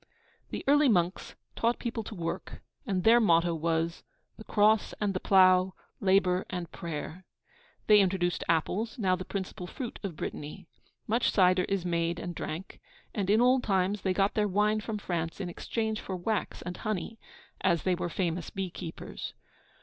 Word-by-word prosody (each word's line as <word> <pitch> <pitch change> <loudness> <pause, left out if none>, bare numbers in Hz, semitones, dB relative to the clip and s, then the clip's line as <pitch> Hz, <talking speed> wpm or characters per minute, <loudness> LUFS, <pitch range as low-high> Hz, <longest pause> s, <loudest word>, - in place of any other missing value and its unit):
The - - -5
early 290 0 +5
monks 180 -3 0 0.2
taught 235 +1 +1
the - - -14
people 230 -2 -2
to 215 - -7
work, 170 0 -5 0.2
and 185 -3 0
their 230 +2 +7
motto 170 -5 +4
was 165 +1 -1 0.3
'The 220 - -12
Cross 215 +1 +3
and 205 -2 0
the 185 - -1
plough, 185 -1 +5 0.2
labour 190 -1 +3
and 180 -3 -5
prayer.' 165 +2 -6 0.6
They 210 -1 +7
introduced 180 -3 +1
apples, 185 - 0
now 190 -5 +2
the 185 - -6
principal 190 -2 -5
fruit 245 +4 -6
of 195 -6 -5
Brittany. 150 +5 -6 0.4
Much 230 +3 +2
cider 185 -2 +4
is 195 -3 -1
made 170 -1 0
and 175 - -5
drank; 165 +3 -6 0.3
and 195 -2 -2
in 215 +3 +5
old 255 +1 +5
times 195 0 +1
they 190 - 0
got 195 +2 +2
their 210 -1 +2
wine 210 +2 +2
from 215 0 -4
France 170 -4 -3
in 190 -3 -3
exchange 220 +4 -2
for 190 - -5
wax 205 +4 -2
and 180 0 -5
honey, 215 +1 -3 0.4
as 170 -4 +2
they 185 - +2
were 175 0 -2
famous 170 -1 -2
bee 190 -2 -4
keepers. 165 -2 -7
185 Hz, 175 wpm, -29 LUFS, 175-210 Hz, 0.6 s, their